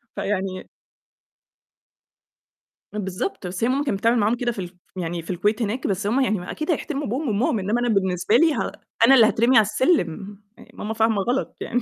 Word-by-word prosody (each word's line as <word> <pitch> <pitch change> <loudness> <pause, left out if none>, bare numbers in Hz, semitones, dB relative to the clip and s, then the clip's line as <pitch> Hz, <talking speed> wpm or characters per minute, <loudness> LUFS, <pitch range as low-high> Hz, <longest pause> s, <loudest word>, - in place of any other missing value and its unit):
فيعني 190 -2 -3 2.3
بالضبط، 190 -1 -4
بس 180 +3 -4
هي 235 - +3
ماما 275 +3 +1
كانت 235 -9 -2
بتعمل 230 +4 +3
معاهم 215 +3 +2
كده 240 0 -1
في 215 - -8
ال 180 - -3
ف - - -17 0.2
يعني 175 -1 -3
في 165 - -15
الكويت 205 +6 0
هناك، 230 +4 -2
بس 200 +1 -1
هم 245 +6 +2
يعني 215 -6 +1
ما 180 - -7
أكيد 310 +3 -2
هيحترموا 300 -2 -2
أبوهم 270 +7 -2
وأمّهم، 220 0 +1
إنّما 210 +5 0
أنا 245 - 0
بالنسبة 190 -1 +1
لي 320 +4 +5
ه - - -2 0.3
أنا 270 +3 +7
اللي 230 - +7
هاترمي 235 +4 +2
على 220 - +6
السِلِّم، 205 - 0 0.2
يع - - -14
ماما 220 +1 -5
فاهمة 220 -2 +2
غلط، 245 +6 -2
يعني 245 +1 -1
215 Hz, 200 wpm, -23 LUFS, 195-245 Hz, 2.3 s, أنا